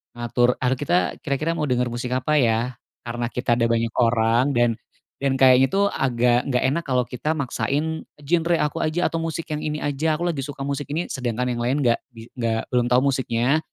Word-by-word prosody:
ngatur 120 Hz, +1 st, +1 dB
ar 130 Hz, 0 st, +2 dB
kita 160 Hz, +6 st, 0 dB
kira-kira 150 Hz, +3 st, -1 dB
mau 150 Hz, -, 0 dB
denger 125 Hz, -1 st, +1 dB
musik 120 Hz, +1 st, -4 dB
apa 130 Hz, +4 st, +1 dB
ya? 120 Hz, 0 st, +1 dB, 0.3 s
Karena 120 Hz, 0 st, -3 dB
kita 120 Hz, 0 st, 0 dB
ada 115 Hz, -, +2 dB
banyak 115 Hz, 0 st, 0 dB
orang, 115 Hz, +3 st, +3 dB
dan 120 Hz, -1 st, +3 dB, 0.5 s
dan 135 Hz, -1 st, 0 dB
kayaknya 130 Hz, 0 st, +5 dB
tuh 200 Hz, +1 st, +3 dB
agak 125 Hz, -4 st, +1 dB
gak 125 Hz, -3 st, 0 dB
enak 160 Hz, +6 st, +1 dB
kalau 130 Hz, -2 st, +1 dB
kita 125 Hz, +5 st, -2 dB
maksain 150 Hz, +2 st, -2 dB, 0.2 s
genre 170 Hz, +3 st, +1 dB
aku 150 Hz, +2 st, -1 dB
aja 165 Hz, +3 st, 0 dB
atau 165 Hz, -, -3 dB
musik 165 Hz, 0 st, -4 dB
yang 150 Hz, 0 st, -2 dB
ini 150 Hz, 0 st, -3 dB
aja, 145 Hz, +2 st, 0 dB
aku 165 Hz, +3 st, -2 dB
lagi 140 Hz, -6 st, -3 dB
suka 145 Hz, -1 st, -8 dB
musik 140 Hz, +1 st, -3 dB
ini 170 Hz, +3 st, -2 dB
sedangkan 125 Hz, -1 st, -2 dB
yang 120 Hz, -, -3 dB
lain 130 Hz, +4 st, +1 dB
gak 120 Hz, -3 st, +2 dB
di 115 Hz, 0 st, -12 dB
nggak, 115 Hz, -2 st, -1 dB
belum 125 Hz, -1 st, +2 dB
tahu 125 Hz, +1 st, +4 dB
musiknya. 130 Hz, +3 st, +1 dB
130 Hz, 200 wpm, -23 LUFS, 120-150 Hz, 0.5 s, kayaknya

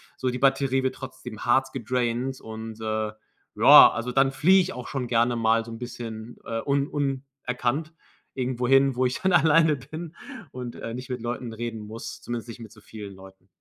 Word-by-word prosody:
so 130 Hz, -, -1 dB
die 125 Hz, -, -3 dB
Batterie 135 Hz, 0 st, +2 dB
wird 130 Hz, -, -1 dB
trotzdem 125 Hz, -4 st, -9 dB
hart 130 Hz, +2 st, +2 dB
gedraint 125 Hz, +1 st, -2 dB
und, 110 Hz, 0 st, -8 dB
äh 110 Hz, -1 st, -2 dB, 0.4 s
joa, -, -, +9 dB
also, 120 Hz, +2 st, -3 dB
dann 135 Hz, +1 st, +3 dB
fliege 185 Hz, +8 st, +5 dB
ich 185 Hz, +1 st, -3 dB
auch 125 Hz, -, -7 dB
schon 130 Hz, -3 st, -3 dB
gerne 120 Hz, 0 st, +2 dB
mal 115 Hz, 0 st, +2 dB
so 115 Hz, -, -9 dB
'n 115 Hz, -, -7 dB
bisschen, 115 Hz, -2 st, -7 dB
äh, 115 Hz, 0 st, -3 dB
un 140 Hz, 0 st, +1 dB
unerkannt 135 Hz, +1 st, -3 dB, 0.4 s
irgendwohin, 130 Hz, +1 st, +2 dB
wo 130 Hz, +1 st, +1 dB
ich 125 Hz, -, -1 dB
dann 190 Hz, 0 st, +2 dB
alleine 160 Hz, -1 st, +5 dB
bin 155 Hz, +5 st, -8 dB, 0.4 s
und, 125 Hz, -2 st, -7 dB
äh, 115 Hz, -, -6 dB
nicht 125 Hz, +1 st, -7 dB
mit 125 Hz, -2 st, -4 dB
Leuten 120 Hz, 0 st, -4 dB
reden 115 Hz, 0 st, -5 dB
muss, 110 Hz, +2 st, -8 dB
zumindest 120 Hz, -1 st, -5 dB
nicht 115 Hz, -, -9 dB
mit 110 Hz, -, -10 dB
so 110 Hz, -2 st, -17 dB
vielen 100 Hz, -2 st, -10 dB
Leuten. 95 Hz, 0 st, -16 dB
125 Hz, 190 wpm, -25 LUFS, 115-135 Hz, 0.4 s, joa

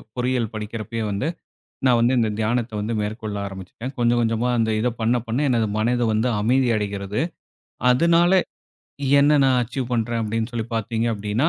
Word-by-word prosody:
பொறியியல் 125 Hz, -2 st, -1 dB
படிக்கிறப்பயே 110 Hz, +1 st, -4 dB
வந்து, 100 Hz, +9 st, -1 dB, 0.6 s
நான் 125 Hz, -2 st, +5 dB
வந்து 120 Hz, +2 st, +3 dB
இந்த 115 Hz, -2 st, +2 dB
தியானத்த 115 Hz, +2 st, 0 dB
வந்து 110 Hz, +3 st, -2 dB
மேற்கொள்ள 105 Hz, 0 st, -4 dB
ஆரம்பிச்சுட்டேன். 95 Hz, +7 st, -8 dB
கொஞ்சம் 120 Hz, 0 st, +3 dB
கொஞ்சமா 115 Hz, +1 st, 0 dB
அந்த 110 Hz, -1 st, +1 dB
இத 125 Hz, -, +2 dB
பண்ண 115 Hz, +2 st, +2 dB
பண்ண, 115 Hz, +3 st, -1 dB
எனது 115 Hz, -3 st, +2 dB
மனது 120 Hz, +2 st, +1 dB
வந்து 110 Hz, +4 st, +1 dB
அமைதி 125 Hz, +3 st, +2 dB
அடைகிறது. 100 Hz, 0 st, -3 dB, 0.7 s
அதனால, 170 Hz, +6 st, +4 dB, 0.9 s
என்ன 145 Hz, +1 st, +4 dB
நான் 130 Hz, -1 st, +4 dB
அச்சீவ் 125 Hz, +1 st, -4 dB
பண்றேன் 115 Hz, 0 st, 0 dB
அப்படின்னு 110 Hz, +2 st, -2 dB
சொல்லி 115 Hz, -2 st, -3 dB
பார்த்தீங்க 115 Hz, +1 st, -1 dB
அப்படின்னா, 105 Hz, +8 st, 0 dB
115 Hz, 155 wpm, -22 LUFS, 110-125 Hz, 0.9 s, நான்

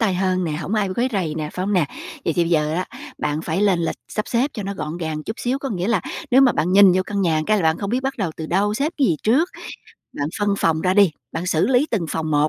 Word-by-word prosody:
tay 205 Hz, -5 st, +2 dB
hơn 185 Hz, 0 st, 0 dB
nè, 160 Hz, -, -2 dB
hổng 170 Hz, +7 st, -3 dB
ai 210 Hz, -2 st, +1 dB
quấy 250 Hz, +2 st, +1 dB
rầy 170 Hz, -6 st, -1 dB
nè, 155 Hz, -1 st, -3 dB
phải 185 Hz, +1 st, -3 dB
hông 205 Hz, -, 0 dB
nè? 180 Hz, -5 st, +3 dB, 0.4 s
Vậy 165 Hz, -, +1 dB
thì 175 Hz, -, +2 dB
bây 165 Hz, -, -3 dB
giờ 155 Hz, -1 st, +2 dB
á, 180 Hz, +1 st, -1 dB, 0.3 s
bạn 150 Hz, +1 st, -1 dB
phải 175 Hz, +5 st, -1 dB
lên 195 Hz, -4 st, +3 dB
lịch -, -, -2 dB
sắp 215 Hz, -, -3 dB
xếp 250 Hz, +5 st, +1 dB
cho 210 Hz, -, -4 dB
nó 200 Hz, +1 st, -4 dB
gọn 160 Hz, -3 st, -5 dB
gàng 160 Hz, -3 st, -4 dB
chút 220 Hz, -, -6 dB
xíu. 255 Hz, +3 st, 0 dB
Có 275 Hz, -, -4 dB
nghĩa 185 Hz, -1 st, -2 dB
là 225 Hz, -6 st, +2 dB, 0.3 s
nếu 260 Hz, +2 st, +6 dB
mà 260 Hz, -2 st, +5 dB
bạn 180 Hz, +3 st, 0 dB
nhìn 195 Hz, -2 st, +7 dB
vô 185 Hz, +1 st, +2 dB
căn 200 Hz, -1 st, -2 dB
nhà 160 Hz, -4 st, +2 dB
cái 215 Hz, 0 st, +3 dB
là 190 Hz, -, 0 dB
bạn 160 Hz, 0 st, +2 dB
không 200 Hz, 0 st, -3 dB
biết 250 Hz, -, +1 dB
bắt 270 Hz, 0 st, -1 dB
đầu 185 Hz, -6 st, -1 dB
từ 160 Hz, -, -5 dB
đâu, 205 Hz, +5 st, +1 dB
xếp 295 Hz, +8 st, -1 dB
cái 270 Hz, -, +4 dB
gì 160 Hz, -, +2 dB
trước, 275 Hz, +11 st, +3 dB, 0.6 s
bạn 145 Hz, +1 st, -2 dB
phân 205 Hz, -1 st, +1 dB
phòng 160 Hz, -1 st, +1 dB
ra 185 Hz, +2 st, +1 dB
đi, 200 Hz, -4 st, +6 dB, 0.2 s
bạn 170 Hz, +3 st, -3 dB
xử 165 Hz, +2 st, +2 dB
lý 260 Hz, +3 st, +3 dB
từng 190 Hz, -8 st, 0 dB
phòng 155 Hz, -1 st, -2 dB
một, 150 Hz, +1 st, +3 dB
185 Hz, 300 wpm, -21 LUFS, 160-215 Hz, 0.6 s, nhìn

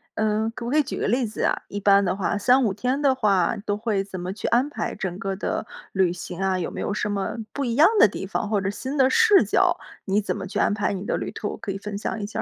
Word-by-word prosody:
嗯， 220 Hz, +1 st, +1 dB
可 235 Hz, -, -6 dB
不 240 Hz, -, -3 dB
可 305 Hz, -, +2 dB
以 -, -, +6 dB
举 270 Hz, -, -5 dB
个 -, -, 0 dB
例 240 Hz, +1 st, +1 dB
子 210 Hz, -, -4 dB
啊？ -, -, +3 dB
一 205 Hz, -, -5 dB
般 200 Hz, 0 st, +5 dB
的 185 Hz, 0 st, 0 dB
话， 200 Hz, +1 st, -1 dB
3-5 245 Hz, -2 st, +3 dB
天 250 Hz, +7 st, -1 dB
的 275 Hz, -2 st, +3 dB
话 205 Hz, -4 st, +2 dB
都 205 Hz, 0 st, 0 dB
会 210 Hz, -3 st, -1 dB
怎 190 Hz, -2 st, -8 dB
么 180 Hz, +2 st, -4 dB
去 210 Hz, -, -4 dB
安 250 Hz, +4 st, +3 dB
排 295 Hz, -, -4 dB
整 185 Hz, -1 st, -4 dB
个 195 Hz, -1 st, -2 dB
的 205 Hz, -, -2 dB, 0.3 s
旅 190 Hz, -3 st, +2 dB
行 180 Hz, +1 st, -7 dB
啊， 190 Hz, -1 st, +1 dB
有 175 Hz, -, -3 dB
没 -, -, -5 dB
有 -, -, -2 dB
什 210 Hz, 0 st, -1 dB
么 200 Hz, +3 st, -2 dB, 0.2 s
不 280 Hz, -, -2 dB
一 235 Hz, -2 st, -1 dB
样 305 Hz, +3 st, +7 dB
的 -, -, +8 dB
地 190 Hz, -, -6 dB
方 205 Hz, +1 st, -3 dB
或 210 Hz, -2 st, +2 dB
者 195 Hz, -, -2 dB
新 260 Hz, +8 st, -4 dB
的 260 Hz, -1 st, +4 dB
视 445 Hz, -4 st, +6 dB
角， -, -, +2 dB, 0.3 s
你 195 Hz, +2 st, +2 dB
怎 210 Hz, -, -2 dB
么 195 Hz, -2 st, -5 dB
去 -, -, -5 dB
安 -, -, +2 dB
排 210 Hz, -1 st, 0 dB
你 195 Hz, 0 st, -4 dB
的 -, -, -1 dB
旅 -, -, -4 dB
途， -, -, -4 dB
可 200 Hz, -, -5 dB
以 195 Hz, -, -4 dB
分 205 Hz, 0 st, -6 dB
享 220 Hz, -, -3 dB
一 205 Hz, -, -3 dB
下 210 Hz, -, -4 dB
205 Hz, 305 characters per minute, -24 LUFS, 195-240 Hz, 0.3 s, 的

